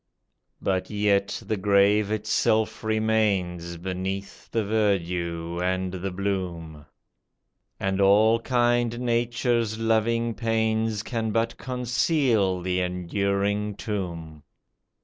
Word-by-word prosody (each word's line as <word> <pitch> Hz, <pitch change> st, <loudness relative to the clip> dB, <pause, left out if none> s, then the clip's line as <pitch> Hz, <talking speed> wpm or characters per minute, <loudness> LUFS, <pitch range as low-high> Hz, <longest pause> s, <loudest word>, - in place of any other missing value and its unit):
But 95 Hz, -1 st, -1 dB
yet 100 Hz, -1 st, +1 dB
the 110 Hz, -, -1 dB
grave 100 Hz, +1 st, +3 dB
itself 110 Hz, +1 st, 0 dB
remains 105 Hz, -6 st, 0 dB
Beneath 95 Hz, +2 st, -5 dB
the 115 Hz, -, 0 dB
verdure 90 Hz, -5 st, -1 dB
and 95 Hz, 0 st, -1 dB
the 95 Hz, +1 st, -3 dB
bloom; 90 Hz, -6 st, -4 dB, 0.9 s
And 95 Hz, 0 st, 0 dB
all 110 Hz, +4 st, +5 dB
kind 120 Hz, -1 st, +1 dB
Nature's 120 Hz, -2 st, 0 dB
loving 115 Hz, +1 st, +1 dB
pains 110 Hz, -1 st, 0 dB
Can 115 Hz, -3 st, -2 dB
but 115 Hz, +1 st, 0 dB
conceal 125 Hz, -, +1 dB
the 90 Hz, 0 st, -1 dB
enduring 100 Hz, +3 st, -1 dB
tomb. 85 Hz, -8 st, -5 dB
105 Hz, 95 wpm, -25 LUFS, 95-115 Hz, 0.9 s, all